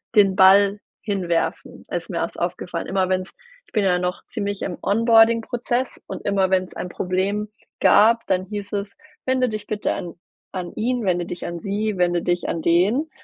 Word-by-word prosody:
den 195 -3 +5
Ball 200 +2 +6 0.2
hinwerfen. 180 -5 -2
Ist - - -3
mir - - -3
erst - - -3
aufgefallen. - - -3
Immer 190 -1 +1
wenn's 185 0 -1 0.4
ich - - -26
bin 210 - +1
ja 180 -2 +2
noch 180 +1 -3
ziemlich 205 -3 -4
im 180 - -4
Onboarding-Prozess 230 +3 +2
und - - -7
immer 195 -2 +2
wenn's 185 -1 0
ein 180 - -5
Problem 195 +4 -1 0.3
gab 230 +2 +5
dann 185 -1 +1
hieß 205 0 -6
es: 200 0 -3 0.3
„Wende 255 -1 +2
dich 215 -2 -5
bitte 210 -1 -1
an 170 -2 -6 0.4
an 180 -2 -5
ihn 245 +2 -1
wende 175 -3 0
dich 175 0 -6
an 170 0 -5
sie 205 +2 -2
wende 175 -1 +2
dich 175 0 0
an 165 - -2
den,“ 200 - +2
200 Hz, 175 wpm, -22 LUFS, 180-215 Hz, 0.4 s, Ball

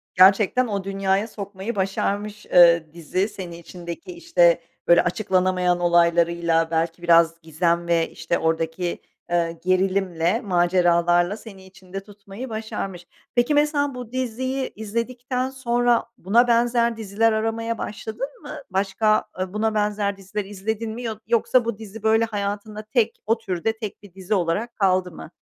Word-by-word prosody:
Gerçekten 195 +6 +5
o 200 -3 -2
dünyaya 195 +1 0
sokmayı 200 +1 -6
başarmış, 200 +2 -2
eee, 170 -3 +5
dizi 180 +5 -2
seni 180 -5 -8
içindeki, 170 - -8
işte, 310 - +3 0.3
böyle, 170 0 +6
açıklanamayan 180 -1 +1
olaylarıyla 170 -1 +2
belki 165 +1 -1
biraz 165 -1 +4
gizem 170 +2 0
ve, 165 -1 +2
işte, 170 - -2
oradaki, 165 +2 -1 0.3
eee, 170 -1 0
gerilimle, 185 +1 +1
maceralarla 175 -1 +2
seni 195 -5 -12
içinde 190 0 -9
tutmayı 205 +4 -10
başarmış. 195 -5 -5 0.3
Peki, 240 +4 +3
mesela 290 -2 +1
bu 245 -2 -8
diziyi 260 +1 -2
izledikten 245 +4 -3
sonra 245 -2 +1
buna 235 +6 +3
benzer 235 0 +2
diziler 220 +1 +1
aramaya 225 +1 -1
başladın 220 +6 -5
mı? 295 - -10 0.2
Başka, 200 +3 +1
ııı, 185 0 -3
buna 220 +1 0
benzer 205 -1 0
diziler 195 +1 -5
izledin 215 +3 -4
mi 235 +3 -6
yo 225 -2 -3
yoksa 235 +1 +3
bu 230 -3 -2
dizi 220 0 -10
böyle 220 +1 +4
hayatında 210 0 -4
tek 225 +1 0
o 225 +2 +2
türde 220 +1 -2
tek 215 -2 -7
bir 200 -4 -15
dizi 190 +2 -4
olarak 200 +5 -1
kaldı 185 -2 +1
mı? 160 - -11
200 Hz, 140 wpm, -23 LUFS, 175-225 Hz, 0.3 s, böyle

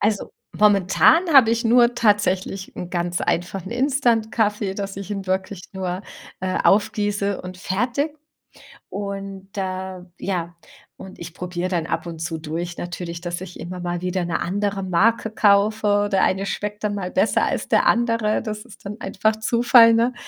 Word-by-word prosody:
Also, 210 -1 0 0.3
momentan 205 - +5
hab 265 -5 +8
ich 230 +1 +1
nur 240 +1 +5
tatsächlich 200 -4 0
'n 180 - -6
ganz 175 -1 -1
einfachen 175 +3 -2
Instant-Kaffee, 225 -6 +1
dass 195 -1 -5
ich 200 +1 -7
ihn 195 -2 -4
wirklich 190 0 -2
nur, 185 -1 -4 0.4
äh, 185 0 -1
aufgieße 205 -1 +1
und 185 0 -8
fertig. 245 - -1 0.7
Und 195 -1 -6
da 185 -1 -4
ja, 175 -3 -3 0.4
und 190 - -11
ich 170 0 -8
probier 180 0 -3
dann 170 -3 -1
ab - - -3
und 165 -1 -7
zu 165 0 -4
durch 170 +3 -5
natürlich, 175 -1 -6
dass 175 0 -4
ich 185 -1 -9
immer 180 +2 -6
mal 175 0 -3
wieder 180 0 -1
'ne 170 - -1
andere 200 +2 -1
Marke 220 +6 +2
kaufe 210 +1 +3
oder 205 0 +2
der 195 -1 +2
eine 195 +1 +1
schmeckt 210 +2 -4
dann 210 -1 0
mal 185 -2 -4
besser 205 - +2
als - - -1
der - - +3
andere. 230 -2 +2
Das 215 -1 -6
ist - - -16
dann 210 +3 -6
einfach 210 +3 0
Zufall, 230 +1 +5
ne? 235 +2 +2
195 Hz, 165 wpm, -22 LUFS, 180-215 Hz, 0.7 s, hab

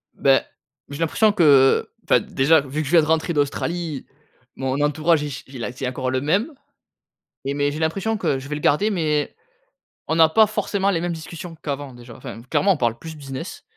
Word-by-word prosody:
Beh, 135 -1 +4 0.5
j'ai 140 +2 -7
l'impression 210 +7 +3
que, 145 -9 +5 0.2
enfin, - - +4
déjà, 145 +3 +3
vu 140 +3 -4
que 155 - -4
je - - -4
viens 170 -2 +6
de - - -1
rentrer 160 +2 +1
d'Australie, 155 +1 -2 0.5
mon 135 +1 -2
entourage 155 +2 +2
il 150 - -4
ch 130 - -7
il 130 -3 -8
a 125 - -3
c'est 125 +1 -5
encore 130 0 -3
le 130 - 0
même. 200 - 0 0.9
Et 140 - -1
mais 145 0 0
j'ai 150 - -5
l'impression 195 +7 -1
que 140 -8 0
je 135 - -10
vais 150 - -2
le 150 - -5
garder 200 +9 +2
mais 155 -6 -1 0.7
on 160 - +1
n'a 160 -1 +7
pas 220 +6 +5
forcément 200 -1 -1
les 175 -4 +1
mêmes 175 0 -2
discussions 165 +1 -8
qu'avant, 140 -2 -4
déjà, 120 -1 -12
enfin, 115 - -9
clairement 195 -1 +3
on - - -5
parle 115 -3 0
plus 160 +5 -9
business, 135 -3 -8
150 Hz, 210 wpm, -22 LUFS, 135-170 Hz, 0.9 s, n'a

